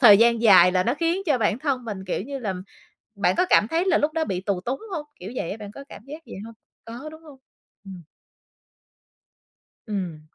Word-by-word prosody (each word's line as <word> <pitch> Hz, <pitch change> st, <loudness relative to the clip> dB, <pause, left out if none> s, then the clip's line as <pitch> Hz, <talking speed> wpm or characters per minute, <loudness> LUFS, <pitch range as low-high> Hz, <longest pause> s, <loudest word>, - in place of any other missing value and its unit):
thời 210 Hz, -6 st, +9 dB
gian 235 Hz, 0 st, +4 dB
dài 185 Hz, -5 st, +7 dB
là 185 Hz, 0 st, +3 dB
nó 240 Hz, +6 st, 0 dB
khiến 335 Hz, +5 st, 0 dB
cho 290 Hz, -5 st, +2 dB
bản 215 Hz, 0 st, +1 dB
thân 270 Hz, -3 st, -1 dB
mình, 200 Hz, -4 st, -6 dB
kiểu 185 Hz, -, -2 dB
như 275 Hz, +5 st, -5 dB
là, 210 Hz, -7 st, -3 dB, 0.6 s
bạn 195 Hz, -3 st, +1 dB
có 370 Hz, -, +3 dB
cảm 210 Hz, -, +5 dB
thấy 330 Hz, +2 st, +1 dB
là 380 Hz, -, +3 dB
lúc 300 Hz, +1 st, +1 dB
đó 325 Hz, -1 st, 0 dB
bị 185 Hz, -8 st, -3 dB
tù 190 Hz, -1 st, -2 dB
túng 250 Hz, +8 st, -3 dB
hông? 300 Hz, -4 st, -4 dB
Kiểu 190 Hz, +5 st, -7 dB
vậy -, -, -2 dB
á, 205 Hz, -, -4 dB
bạn 210 Hz, -2 st, -9 dB
có 275 Hz, -, -10 dB
cảm -, -, -11 dB
giác 305 Hz, +3 st, -9 dB
vậy -, -, -9 dB
hông? 230 Hz, 0 st, -10 dB, 0.3 s
Có, 240 Hz, +6 st, -8 dB
đúng 315 Hz, +1 st, -13 dB
hông? 295 Hz, -4 st, -14 dB, 0.5 s
Ừm. 190 Hz, -3 st, -10 dB, 1.8 s
Ừm. 185 Hz, -7 st, -4 dB
230 Hz, 220 wpm, -24 LUFS, 195-295 Hz, 1.8 s, thời